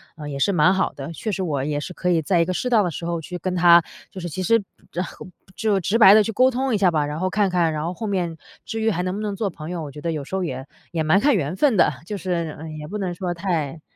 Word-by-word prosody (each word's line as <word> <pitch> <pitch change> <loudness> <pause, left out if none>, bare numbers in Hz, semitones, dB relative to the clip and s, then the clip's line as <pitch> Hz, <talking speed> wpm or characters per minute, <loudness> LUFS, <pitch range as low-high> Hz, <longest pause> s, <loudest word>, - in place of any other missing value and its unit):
呃， 150 -2 -7
也 140 - -4
是 200 +8 +2
蛮 180 +2 +4
好 190 - 0
的， 140 +3 -7
确 215 +6 -4
实 190 - -2
我 145 -7 -1
也 145 0 -1
是 180 - -6
可 180 +1 -1
以 165 -2 +3
在 175 +3 +1
一 170 - +3
个 185 - -2
适 250 - -2
当 225 -4 +4
的 175 - -1
时 170 - -7
候 170 -1 -2
去 180 +3 -7
跟 185 -1 -2
他 170 -1 +7 0.3
就 185 - -8
是 175 - -4
其 185 +5 -4
实， 230 +2 +3 0.3
然 180 +1 -1
后， - - -10 0.3
就 210 -3 +1
直 200 +5 +1
白 200 -4 +9
地 215 - +7
去 225 - -3
沟 255 +4 +4
通 260 0 -1
一 - - +3
下 195 -2 +4
吧。 150 -2 +1
然 150 +2 -4
后 185 0 0
看 200 0 +1
看 170 -3 +1
然 150 - -3
后 175 - -2
后 220 - -6
面 175 -5 -2 0.3
至 225 - -4
于 220 0 +2
还 180 - -1
能 185 0 -2
不 210 - -4
能 205 -2 -3
做 205 -1 -1
朋 160 -1 -9
友， 175 -2 -4
我 145 - -7
觉 150 - -10
得 170 - -1
有 150 -2 -4
时 190 - -6
候 190 - -1
也 130 -4 -4 0.3
也 160 -2 -1
蛮 160 +6 +4
看 280 -1 +3
缘 160 0 -1
分 270 +1 +3
的， 160 - +5
就 210 - -4
是， 170 -3 -2
嗯， 155 -1 -7
也 150 0 -7
不 210 - -5
能 185 -3 -2
说 180 -2 -3
太 165 -4 -2
180 Hz, 335 characters per minute, -22 LUFS, 160-200 Hz, 0.3 s, 白